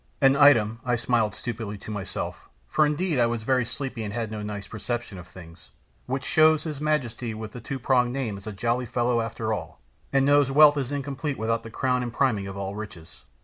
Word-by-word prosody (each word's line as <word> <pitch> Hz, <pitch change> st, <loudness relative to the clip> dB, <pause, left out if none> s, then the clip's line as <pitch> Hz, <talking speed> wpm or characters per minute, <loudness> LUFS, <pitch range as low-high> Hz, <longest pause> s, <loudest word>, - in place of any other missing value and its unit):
"An 135 Hz, -1 st, +5 dB
item," 115 Hz, -6 st, +5 dB
I 125 Hz, -1 st, +1 dB
smiled 115 Hz, -2 st, +1 dB
stupidly 110 Hz, -3 st, -5 dB
to 110 Hz, -, -9 dB
myself, 100 Hz, -3 st, -5 dB, 0.2 s
for 150 Hz, -, +3 dB
indeed 150 Hz, 0 st, 0 dB
I 120 Hz, -, +4 dB
was 115 Hz, -1 st, -2 dB
very 130 Hz, +1 st, +2 dB
sleepy 125 Hz, -1 st, -5 dB
and 105 Hz, -, -4 dB
had 115 Hz, -1 st, -3 dB
no 110 Hz, -1 st, -4 dB
nice 105 Hz, -1 st, -5 dB
perception 115 Hz, -2 st, -4 dB
of 90 Hz, -, -11 dB
things, 85 Hz, -2 st, -14 dB, 0.4 s
"which 130 Hz, +1 st, -2 dB
shows 155 Hz, +2 st, +4 dB
his 150 Hz, -3 st, -5 dB
majesty 125 Hz, -7 st, -1 dB
with 110 Hz, 0 st, -7 dB
the 125 Hz, -, -9 dB
two 135 Hz, -, -4 dB
pronged 125 Hz, -1 st, +2 dB
name 125 Hz, -6 st, -2 dB
is 100 Hz, +2 st, -10 dB
a -, -, -3 dB
jolly 120 Hz, +4 st, -1 dB
fellow 120 Hz, 0 st, +1 dB
after 115 Hz, -1 st, -2 dB
all, 80 Hz, -6 st, -6 dB, 0.3 s
and 135 Hz, -1 st, +3 dB
knows 145 Hz, -1 st, +4 dB
wealth 145 Hz, +1 st, +7 dB
is 135 Hz, -1 st, -2 dB
incomplete 140 Hz, 0 st, -3 dB
without 115 Hz, +1 st, 0 dB
the 115 Hz, -, -9 dB
crown 125 Hz, +2 st, 0 dB
and 120 Hz, -1 st, -3 dB
priming 115 Hz, -6 st, +1 dB
of 95 Hz, 0 st, -7 dB
all 100 Hz, 0 st, -4 dB
riches. 100 Hz, -6 st, -9 dB
120 Hz, 215 wpm, -26 LUFS, 110-135 Hz, 0.4 s, wealth